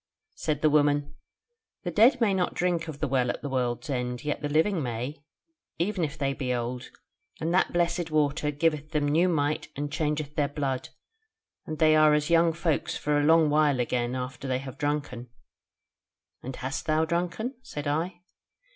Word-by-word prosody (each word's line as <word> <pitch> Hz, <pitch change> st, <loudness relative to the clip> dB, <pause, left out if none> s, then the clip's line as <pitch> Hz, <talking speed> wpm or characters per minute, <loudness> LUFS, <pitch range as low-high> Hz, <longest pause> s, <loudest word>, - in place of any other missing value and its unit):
"Said 150 Hz, -1 st, -2 dB
the 155 Hz, -, +6 dB
woman: 145 Hz, -1 st, +2 dB, 0.7 s
'The 175 Hz, -, -3 dB
dead 235 Hz, -, +5 dB
may 220 Hz, -5 st, +3 dB
not 185 Hz, -2 st, 0 dB
drink 175 Hz, -2 st, 0 dB
of 155 Hz, -3 st, -6 dB
the -, -, +1 dB
Well 130 Hz, -2 st, +1 dB
at -, -, -4 dB
the 145 Hz, -, -3 dB
World's 125 Hz, +2 st, -1 dB
End; 125 Hz, -2 st, -3 dB
yet 150 Hz, 0 st, -2 dB
the 145 Hz, -, -2 dB
living 160 Hz, +4 st, +2 dB
may, 125 Hz, +4 st, -4 dB, 0.5 s
even 180 Hz, +1 st, 0 dB
if 155 Hz, 0 st, -3 dB
they 140 Hz, -2 st, 0 dB
be 130 Hz, -2 st, -3 dB
old; 120 Hz, +1 st, -4 dB, 0.5 s
and 165 Hz, +2 st, -1 dB
that 185 Hz, -, +3 dB
blessed 175 Hz, 0 st, 0 dB
water 150 Hz, -1 st, +1 dB
giveth 150 Hz, +1 st, -1 dB
them 150 Hz, -1 st, +1 dB
new 165 Hz, +5 st, +3 dB
might 150 Hz, -2 st, 0 dB
and 145 Hz, +1 st, -3 dB
changeth 150 Hz, -2 st, -2 dB
their 145 Hz, -2 st, +2 dB
blood, 135 Hz, -3 st, -3 dB, 0.8 s
and 155 Hz, -, -4 dB
they 155 Hz, -1 st, +5 dB
are 155 Hz, -1 st, +6 dB
as 150 Hz, +2 st, 0 dB
young 165 Hz, 0 st, +5 dB
folk 165 Hz, -2 st, -1 dB
for 150 Hz, 0 st, 0 dB
a -, -, +1 dB
long 160 Hz, -1 st, +5 dB
while 150 Hz, -3 st, +3 dB
again 120 Hz, 0 st, -1 dB
after 130 Hz, +1 st, -5 dB
they 130 Hz, -1 st, +1 dB
have 130 Hz, 0 st, -8 dB
drunken.' 145 Hz, -5 st, -2 dB, 1.1 s
'And 130 Hz, +1 st, -6 dB
hast 135 Hz, +1 st, -4 dB
thou 155 Hz, +1 st, +2 dB
drunken?' 175 Hz, +9 st, -2 dB
said 150 Hz, -, -7 dB
I. 170 Hz, +5 st, -2 dB
150 Hz, 180 wpm, -27 LUFS, 135-165 Hz, 1.1 s, the